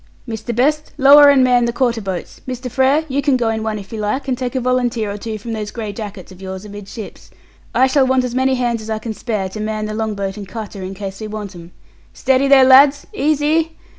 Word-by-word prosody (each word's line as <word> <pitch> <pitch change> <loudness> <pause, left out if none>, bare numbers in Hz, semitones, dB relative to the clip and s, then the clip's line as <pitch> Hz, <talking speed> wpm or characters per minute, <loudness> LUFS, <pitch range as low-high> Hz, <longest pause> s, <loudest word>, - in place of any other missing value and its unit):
"Mr. 225 0 -5
Best 300 +5 0
lower 285 +1 +8
and 275 -2 +5
man 245 -1 +3
the 235 - 0
quarter 235 -2 0
boats! 190 -3 -6
Mr. 250 -1 -5
Frere 270 +5 +2
you 280 0 -1
can 275 -2 +2
go 235 -2 0
in 220 0 -2
one, 220 -1 -2
if 200 +1 -10
you 220 - -4
like, 215 +7 -2
and 260 - 0
take 250 0 -4
a - - +1
volunteer 245 -4 0
or 200 - -5
two 220 0 -5
from 225 +2 -6
those 210 -1 -4
grey 215 -3 -6
jackets 200 -3 -8
of 185 0 -14
yours 190 +1 -7
amidships. 205 +1 -10 0.5
I 260 - +5
shall 265 0 +2
want 260 0 +2
as 250 -1 -3
many 260 +1 +2
hands 240 -2 -1
as 215 - -9
I 220 - -1
can 220 +1 -5
spare 215 -4 -3
to 215 - -8
man 215 0 -3
the 215 - -4
long 220 -1 -2
boat 195 0 -4
and 200 -2 -7
cutter, 210 -1 -7
in 185 +1 -6
case 195 +1 -7
we 215 - -4
want 210 -2 -6
'em. 170 -1 -12 0.4
Steady 265 +1 +2
there, 270 -1 +7
lads! 275 +2 +6
Easy!" 310 +2 +1
230 Hz, 245 wpm, -18 LUFS, 210-260 Hz, 0.5 s, lower